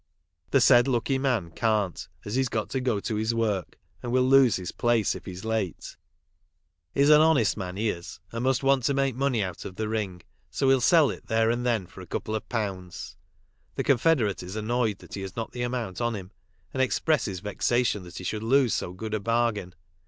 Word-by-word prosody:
The 135 - +4
said 120 0 +6
lucky 130 +1 0
man 120 -11 0
can't, 105 -3 -1 0.2
as 105 - -5
he's 130 0 +1
got 110 -2 -3
to 130 - -1
go 125 -5 0
to 110 0 -2
his 110 +2 0
work, 105 -7 -1 0.2
and 120 - -4
will 130 +1 +3
lose 130 -2 +5
his 90 -2 -4
place 120 -3 +1
if - - -9
he's 95 +2 -8
late. 110 -8 -3 0.5
" 85 +1 -50
He's 140 +2 +5
an 150 0 +8
honest 150 -9 +3
man 95 -2 -5
he 110 +1 +1
is, 85 0 -9
and 115 +1 -4
must 130 0 +1
want 135 -1 +3
to 140 - +2
make 135 -1 +1
money 130 -4 +1
out 90 -3 -5
of 95 - -8
the 110 +2 -2
ring, 100 -5 -3 0.3
so 135 - +1
he'll 135 -1 +4
sell 155 +1 +5
it - - -10
there 115 0 +2
and 120 +1 -2
then 115 -6 +1
for - - -13
a - - -11
couple 110 - -4
of 110 - -4
pounds." 95 -7 -4 0.6
The - - -1
con 140 -4 +3
federate 120 - +2
is 90 +3 -7
annoyed 110 -1 0
that - - -15
he 100 - -4
has 95 -2 -7
not 115 - -4
the 125 - -6
amount 120 -5 -3
on 120 -1 0
him, 95 -2 -8 0.4
and 130 - 0
expresses 130 - +1
vexation 105 +2 0
that 90 0 -11
he - - -6
should 105 +4 -3
lose 125 0 +3
so 90 - -2
good 110 +3 -6
a 110 - 0
bargain. 115 -4 0
115 Hz, 220 wpm, -26 LUFS, 100-125 Hz, 0.6 s, an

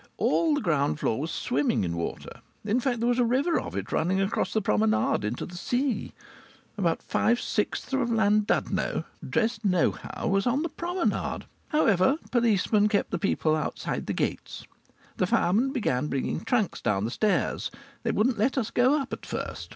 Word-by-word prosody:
All 320 -3 +2
the 290 - -1
ground 150 - +1
floor 110 - 0
was 160 - -3
swimming 130 -7 0
in 85 -2 -2
water. 85 0 -5 0.2
In 215 +4 +2
fact 250 -2 -1
there 235 - +1
was 245 +1 +2
a - - +5
river 270 +8 +2
of - - -7
it - - -4
running 185 +4 +1
across 195 +2 0
the 220 - +1
promenade 110 - +1
into 105 +4 -3
the 180 - -11
sea. 245 +4 -1 0.6
About 175 -6 0
five 240 +2 +1
sixths 210 +4 -2
of 265 -3 +1
Llandudno, 215 -2 +1 0.3
dressed 225 -1 0
nohow, 185 -4 0
was 195 +1 +1
on 270 +5 +1
the 335 - -2
promenade. 345 +4 -2 0.2
However, 260 - +3
policemen 215 -3 +3
kept 210 -2 0
the - - -1
people 160 -6 +1
outside 155 - -3
the - - -1
gates. - - -3 0.5
The - - +1
firemen 230 +9 +2
began 150 - 0
bringing 140 -2 -2
trunks 230 -7 0
down 105 -2 0
the 115 - -3
stairs; 210 - 0 0.3
they - - -2
wouldn't 225 0 +1
let 255 +6 +1
us 230 -4 -1
go 260 +5 +3
up 275 - -5
at - - -6
first. - - -5
215 Hz, 175 wpm, -27 LUFS, 165-250 Hz, 0.6 s, a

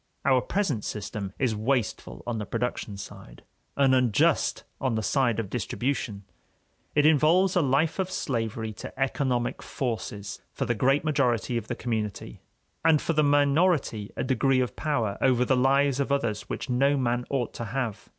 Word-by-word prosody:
Our 130 -2 +4
present 160 - -1
system 100 -1 -4
is 125 -5 0
wasteful 110 - -2
on 120 -2 -2
the 105 - -4
production 110 -3 -3
side, - - -11 0.3
and 135 -2 +4
unjust 125 -5 +2 0.2
on 130 -4 0
the 110 - -1
side 120 -5 +1
of 105 -4 -4
distribution. 120 -3 -2 0.7
It 150 0 +4
involves 160 +5 +4
a 180 - +4
life 145 +5 +1
of 190 -1 0
slavery 115 - -2
to - - -9
economic 130 -3 0
forces 110 -6 -4
for - - -2
the 120 - +1
great 135 +6 +2
majority 125 -6 +1
of 115 - -3
the - - -3
community, 105 - -4 0.4
and 160 -2 +5
for 165 - -1
the 155 - +3
minority 145 - +2
a - - -1
degree 130 +1 +2
of 125 -1 -1
power 115 -10 -1
over 125 -2 +3
the 130 - +3
lives 135 +1 +3
of 140 0 -1
others 115 -7 -1
which - - -4
no 135 +3 +2
man 120 -1 0
ought 130 -4 -1
to 120 - -5
have. 115 -1 -4
125 Hz, 170 wpm, -27 LUFS, 110-140 Hz, 0.7 s, and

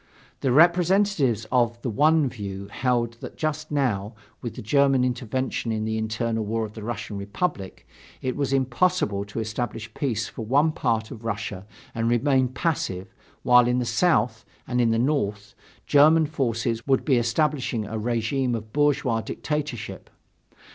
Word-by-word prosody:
The 130 - 0
representatives 170 - +3
of 120 -2 +2
the 125 - -1
one 150 +5 +4
view 100 -5 -6
held 120 0 0
that - - -8
just 155 0 -2
now, 115 -8 -1 0.3
with 120 - -5
the - - -7
German 135 +2 +3
intervention 125 -1 -2
in 110 -1 -1
the 110 0 -1
internal 110 +1 -1
war 110 +1 -1
of 105 - -10
the 110 - -8
Russian 110 -1 -5
Republic, 100 - -4 0.3
it 130 - -2
was 140 -2 -1
impossible 130 - +1
to 100 +2 -6
establish 110 0 -4
peace 115 -6 -1
for 115 - -7
one 145 +8 +3
part 115 -6 -1
of 115 -4 -9
Russia 105 -3 -4 0.3
and 115 0 0
remain 130 +2 +3
passive, 120 - -2 0.3
while 125 -1 +6
in 125 0 +2
the 125 - 0
South 115 -7 +1 0.2
and 125 -1 +1
in 115 - +3
the 115 - +2
North, 105 -6 -1 0.3
German 155 +3 +5
forces 120 -5 -2
would 135 -1 +2
be 135 -4 +3
establishing 120 -1 0
a 110 +2 -4
regime 120 +3 0
of 110 -1 -7
bourgeois 140 -6 +2
dictatorship. 150 -5 -4
120 Hz, 155 wpm, -25 LUFS, 110-140 Hz, 0.3 s, while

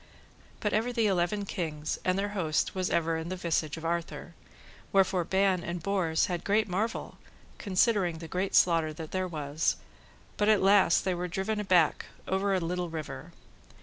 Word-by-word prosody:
But 210 - -1
ever 225 +3 +1
the 230 -2 +1
eleven 195 +1 +1
kings 155 -6 -3
and 185 0 +1
their 200 +1 -1
host 170 -7 -1
was 185 -1 -1
ever 165 -1 +1
in 160 +1 -5
the 185 - -3
visage 165 -4 -1
of 165 - -8
Arthur. 170 0 -3 0.6
Wherefore 190 -2 +3
Ban 190 0 +1
and 170 -1 -5
Bors 180 -5 +1
had 175 -2 -3
great 210 +2 +2
marvel, 210 +5 -3 0.4
considering 190 -3 +1
the 165 0 -8
great 185 +3 -2
slaughter 165 -3 +4
that 155 0 -8
there 185 0 -1
was, 150 -2 -1 0.6
but 210 0 +2
at 215 - +6
the 190 - 0
last 195 -3 +5
they 190 - +1
were 180 +1 -3
driven 195 +4 -2
aback 180 -6 +2 0.2
over 195 +1 0
a - - +1
little 175 +1 -2
river. 155 -1 -7
180 Hz, 180 wpm, -29 LUFS, 165-195 Hz, 0.6 s, at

